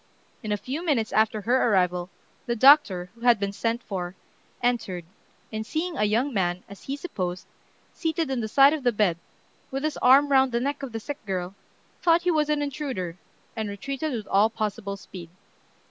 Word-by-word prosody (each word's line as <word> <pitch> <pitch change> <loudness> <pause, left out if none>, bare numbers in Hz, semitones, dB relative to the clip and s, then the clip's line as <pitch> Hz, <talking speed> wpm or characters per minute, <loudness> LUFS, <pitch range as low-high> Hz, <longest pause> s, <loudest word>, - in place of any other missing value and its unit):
In 215 -4 -4
a 210 - +1
few 275 - -5
minutes 270 -10 0
after 220 0 +2
her 245 +3 +2
arrival, 180 -2 +1 0.4
the 235 - 0
doctor, 215 -9 +5
who 235 - -21
had 240 -3 +4
been 200 0 -1
sent 230 +3 -2
for, 185 -2 -5 0.5
entered, 200 -8 -1 0.5
and 220 0 -2
seeing 330 +8 -3
a 210 - +1
young 235 +7 +1
man, 180 -3 0
as 200 0 -13
he 275 - -3
supposed, 185 - -4 0.5
seated 325 -3 -1
on 260 - -1
the 220 - -2
side 275 +6 +6
of 310 - -2
the 245 -1 +2
bed, 205 -6 +1 0.5
with 270 +1 -4
his 310 -1 -1
arm 275 +3 +5
round 265 -2 +4
the 235 - +2
neck 280 +3 -2
of 275 -3 -5
the 225 - -4
sick 290 +5 -7
girl, 185 -1 -3 0.5
thought 340 0 +4
he 360 - +2
was 305 -2 +1
an 295 -1 +1
intruder, 265 - -4 0.4
and 220 -2 -3
retreated 275 +9 -4
with 225 -5 -4
all 205 +3 +3
possible 210 -2 -3
speed. 180 -3 -10
235 Hz, 190 wpm, -26 LUFS, 200-280 Hz, 0.5 s, side